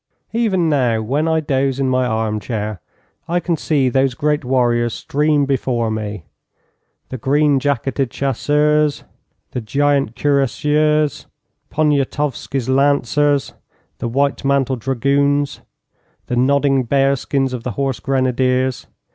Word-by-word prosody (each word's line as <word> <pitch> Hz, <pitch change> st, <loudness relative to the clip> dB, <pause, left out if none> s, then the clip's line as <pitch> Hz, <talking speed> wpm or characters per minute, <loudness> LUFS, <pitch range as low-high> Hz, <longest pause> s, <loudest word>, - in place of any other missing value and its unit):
Even 205 Hz, -7 st, +1 dB
now, 125 Hz, -7 st, +1 dB
when 140 Hz, +9 st, -1 dB
I 160 Hz, 0 st, +1 dB
doze 135 Hz, -2 st, 0 dB
in 135 Hz, -, +1 dB
my 130 Hz, -1 st, +1 dB
arm 110 Hz, -2 st, -1 dB
chair, 105 Hz, -4 st, -4 dB, 0.5 s
I 175 Hz, +1 st, +1 dB
can 175 Hz, -1 st, -1 dB
see 145 Hz, -4 st, +1 dB
those 130 Hz, 0 st, +1 dB
great 150 Hz, +2 st, 0 dB
warriors 120 Hz, -2 st, +1 dB
stream 150 Hz, 0 st, +1 dB
before 125 Hz, -4 st, -1 dB
me 105 Hz, -5 st, -5 dB, 0.8 s
the 130 Hz, -, -6 dB
green 145 Hz, +3 st, +2 dB
jacketed 135 Hz, -1 st, -1 dB
chasseurs, 150 Hz, +3 st, +1 dB, 0.5 s
the 125 Hz, -, -3 dB
giant 140 Hz, +1 st, 0 dB
cuirassiers, 150 Hz, +2 st, +1 dB, 0.4 s
Poniatowsky's 145 Hz, -3 st, -1 dB
lancers, 140 Hz, +1 st, +2 dB, 0.5 s
the -, -, -3 dB
white 140 Hz, +5 st, 0 dB
mantled 135 Hz, -2 st, +1 dB
dragoons, 140 Hz, +3 st, 0 dB, 0.6 s
the 125 Hz, -, -3 dB
nodding 135 Hz, +1 st, +2 dB
bearskins 135 Hz, 0 st, +1 dB
of 125 Hz, -, -4 dB
the 125 Hz, -, -4 dB
horse 135 Hz, -2 st, -2 dB
grenadiers. 130 Hz, -1 st, 0 dB
135 Hz, 120 wpm, -18 LUFS, 125-145 Hz, 0.8 s, green